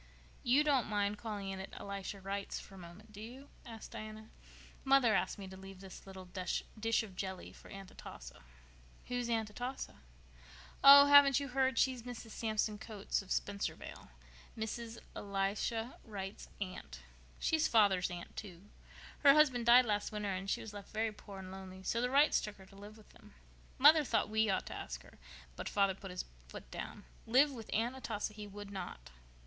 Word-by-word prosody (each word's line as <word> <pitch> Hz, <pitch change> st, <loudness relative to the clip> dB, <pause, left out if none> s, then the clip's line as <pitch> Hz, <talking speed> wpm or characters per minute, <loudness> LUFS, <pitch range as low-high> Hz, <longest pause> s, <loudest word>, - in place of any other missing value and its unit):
"You 260 Hz, +5 st, +4 dB
don't 280 Hz, -6 st, +2 dB
mind 205 Hz, -1 st, 0 dB
calling 205 Hz, -4 st, -4 dB
in 190 Hz, 0 st, -4 dB
at 190 Hz, -, -8 dB
Elisha 200 Hz, 0 st, -5 dB
Wright's 195 Hz, +1 st, -4 dB
for -, -, -13 dB
a -, -, -11 dB
moment, 180 Hz, +5 st, -12 dB
do 210 Hz, 0 st, -10 dB
you?" 255 Hz, +5 st, -10 dB, 0.2 s
asked 225 Hz, -2 st, -9 dB
Diana. 215 Hz, -1 st, -8 dB, 0.5 s
"Mother 270 Hz, -4 st, +5 dB
asked -, -, +1 dB
me 195 Hz, -2 st, -7 dB
to 190 Hz, -, -9 dB
leave 195 Hz, 0 st, -11 dB
this 195 Hz, 0 st, -11 dB
little 190 Hz, -1 st, -9 dB
dish 215 Hz, +5 st, -1 dB
of 195 Hz, -4 st, -10 dB
jelly 190 Hz, -1 st, -5 dB
for -, -, -15 dB
Aunt 195 Hz, -1 st, -9 dB
Atossa." -, -, -11 dB, 0.7 s
"Who -, -, -4 dB
is 245 Hz, -1 st, -1 dB
Aunt 225 Hz, -2 st, 0 dB
Atossa?" 245 Hz, +5 st, -5 dB, 0.9 s
"Oh, 280 Hz, +1 st, +11 dB
haven't 285 Hz, -1 st, +8 dB
you 280 Hz, -1 st, -4 dB
heard? 260 Hz, -1 st, +1 dB
She's 255 Hz, -1 st, +2 dB
Mrs. 235 Hz, -1 st, -8 dB
Samson 215 Hz, -1 st, -1 dB
Coates 205 Hz, -2 st, -3 dB
of 195 Hz, -, -15 dB
Spencervale—Mrs. 200 Hz, -, -5 dB, 0.2 s
Elisha 205 Hz, +4 st, -2 dB
Wright's 200 Hz, -2 st, -7 dB
aunt. 75 Hz, -, -6 dB, 0.4 s
She's 320 Hz, -1 st, +2 dB
father's 200 Hz, -5 st, +4 dB
aunt, 175 Hz, -1 st, -8 dB
too. 185 Hz, -4 st, -8 dB, 0.6 s
Her 280 Hz, -1 st, +7 dB
husband 260 Hz, -6 st, +4 dB
died 245 Hz, +1 st, +8 dB
last 205 Hz, -2 st, -1 dB
winter 210 Hz, -2 st, -2 dB
and 195 Hz, +1 st, -4 dB
she -, -, 0 dB
was 220 Hz, -, -8 dB
left 205 Hz, -1 st, -9 dB
very 220 Hz, 0 st, -1 dB
poor 205 Hz, -1 st, -11 dB
and 190 Hz, -1 st, -8 dB
lonely, 190 Hz, 0 st, -9 dB
so 230 Hz, +4 st, 0 dB
the 250 Hz, -, +1 dB
Wrights 285 Hz, +3 st, +5 dB
took 210 Hz, -1 st, -6 dB
her 190 Hz, -, -14 dB
to 195 Hz, -, -18 dB
live 205 Hz, +2 st, -11 dB
with 215 Hz, -, -18 dB
them. -, -, -18 dB, 0.4 s
Mother 300 Hz, +3 st, +8 dB
thought 255 Hz, -, +1 dB
we 220 Hz, 0 st, +2 dB
ought 190 Hz, -, 0 dB
to -, -, -6 dB, 0.2 s
take -, -, -6 dB
her, -, -, -18 dB, 0.4 s
but -, -, -5 dB
father 200 Hz, -1 st, +3 dB
put 195 Hz, +1 st, -9 dB
his 180 Hz, 0 st, -4 dB, 0.2 s
foot 65 Hz, -, -10 dB
down. -, -, -6 dB, 0.2 s
Live 270 Hz, +6 st, +5 dB
with 230 Hz, -5 st, -9 dB
Aunt 235 Hz, +4 st, 0 dB
Atossa 215 Hz, -5 st, -3 dB
he 210 Hz, -1 st, -8 dB
would 205 Hz, 0 st, -9 dB
not." 175 Hz, -, -7 dB
210 Hz, 185 wpm, -35 LUFS, 195-235 Hz, 0.9 s, Oh